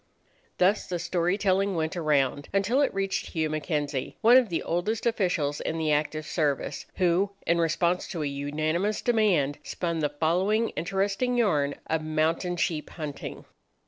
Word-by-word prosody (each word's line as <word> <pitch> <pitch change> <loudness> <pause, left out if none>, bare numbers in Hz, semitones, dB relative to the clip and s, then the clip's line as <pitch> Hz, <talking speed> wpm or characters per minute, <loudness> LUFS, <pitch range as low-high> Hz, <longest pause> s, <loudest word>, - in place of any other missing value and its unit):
Thus 190 +4 +2
the 180 - -2
story 175 +2 0
telling 195 -1 +1
went 160 0 -1
around 145 -4 +1
until 200 +8 +2
it 285 - +2
reached 195 0 -2
Hugh 160 -3 0
M'Kenzie, 150 -3 -2
one 235 +2 +7
of 255 -4 +5
the 170 - -2
oldest 190 +6 -1
officials 180 -10 0
in 160 - -2
the 160 -1 0
active 155 +1 0
service, 150 -5 -1
who, 185 +2 +2
in 170 0 +2
response 170 +2 +1
to 165 -5 -4
a - - -1
unanimous 155 +8 -1
demand, 195 - +2
spun 170 -2 -3
the 150 -1 +1
following 180 +9 +1
interesting 195 +7 -1
yarn 150 -11 +2
of 160 0 -1
mountain 160 +3 0
sheep 160 -3 -1
hunting. 150 -4 -7
170 Hz, 155 wpm, -27 LUFS, 155-195 Hz, -, one